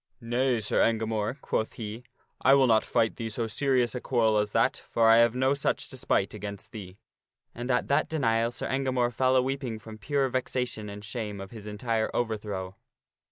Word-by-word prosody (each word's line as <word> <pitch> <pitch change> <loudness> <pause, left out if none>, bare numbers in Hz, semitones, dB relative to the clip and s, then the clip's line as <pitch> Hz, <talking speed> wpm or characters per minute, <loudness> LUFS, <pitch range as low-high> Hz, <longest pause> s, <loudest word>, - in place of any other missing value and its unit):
" - - -47
Nay, 120 +1 +1
Sir 105 - 0
Engamore," 110 +2 0
quoth 110 - -1
he, 110 +1 -7 0.2
" - - -43
I 135 +2 +6
will 135 -1 +5
not 110 -3 +4
fight 110 - +1
thee 115 -1 -3
so 115 +2 -2
serious 125 +2 +1
a 125 - -4
quarrel 110 -4 +2
as 105 0 -1
that, - - +1
for 115 -1 +3
I 115 0 +7
have 115 0 +4
no 130 +2 +2
such 140 - -1
despite 130 -7 0
against 105 +1 -7
thee." 100 -5 -9 0.6
And 120 +2 -6
at 125 -1 +1
that 140 - +2
de 160 - -2
nial 115 -4 +2
Sir 120 - -5
Engamore 130 -2 0
fell 130 +2 +2
a 130 - +4
weeping 130 -3 -3
from 110 0 -11
pure 140 +5 +1
vexation 125 -4 -2
and 105 0 -8
shame 110 -3 -5
of 95 0 -8
his 110 -2 -10
entire 110 +1 -1
overthrow. 105 -5 -3
115 Hz, 205 wpm, -28 LUFS, 110-130 Hz, 0.6 s, I